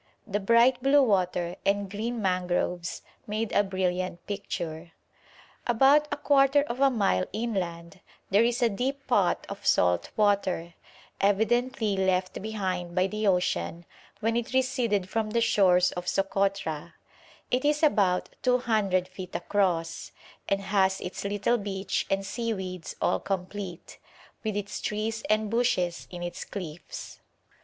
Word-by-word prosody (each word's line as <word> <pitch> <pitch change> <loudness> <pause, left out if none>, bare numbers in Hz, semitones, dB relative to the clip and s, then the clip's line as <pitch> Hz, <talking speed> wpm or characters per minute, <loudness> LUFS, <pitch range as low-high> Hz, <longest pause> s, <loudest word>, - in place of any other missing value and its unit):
The 205 0 -1
bright 235 +5 +4
blue 275 +2 +5
water 180 -5 +1
and 200 0 +1
green 220 +3 -3
mangroves 180 -1 -1 0.2
made 215 +1 -2
a 205 - +4
brilliant 185 -2 -2
picture. 170 -5 -5 0.7
About 275 +5 +5
a 290 - -1
quarter 280 0 +4
of 250 -3 -5
a 275 0 +5
mile 200 - +1
inland 185 -6 -3 0.3
there 205 +4 +5
is 240 +1 +1
a 235 - +4
deep 270 +6 -3
pot 205 -8 +2
of 200 0 -8
salt 90 -1 +2
water, 195 -5 +1 0.5
evidently 220 +2 +1
left 185 0 0
behind 185 -5 -3
by 185 0 +3
the 215 +2 -1
ocean 180 -2 0 0.4
when 225 +1 +1
it 235 +1 -2
receded 245 -7 +1
from 220 +2 -1
the 235 +2 +1
shores 185 -5 +4
of 180 0 -6
Sokotra; 195 -5 -1 0.6
it 250 +1 +1
is 295 +2 +1
about 195 -11 +3
200 220 -7 +2
feet 185 0 -9
across, 170 -5 -1 0.4
and 195 0 +1
has 190 -1 +2
its 180 - -5
little 205 +4 +1
beach 195 -1 -2
and 195 0 0
seaweeds 190 -4 -4
all - - +2
complete, 190 -2 -5 0.4
with 215 -2 -2
its 205 0 -4
trees 220 +2 -2
and 215 -1 +1
bushes 185 -8 0
in 175 -1 -7
its 175 0 -5
cliffs. 175 -5 -8
200 Hz, 135 wpm, -27 LUFS, 180-230 Hz, 0.7 s, blue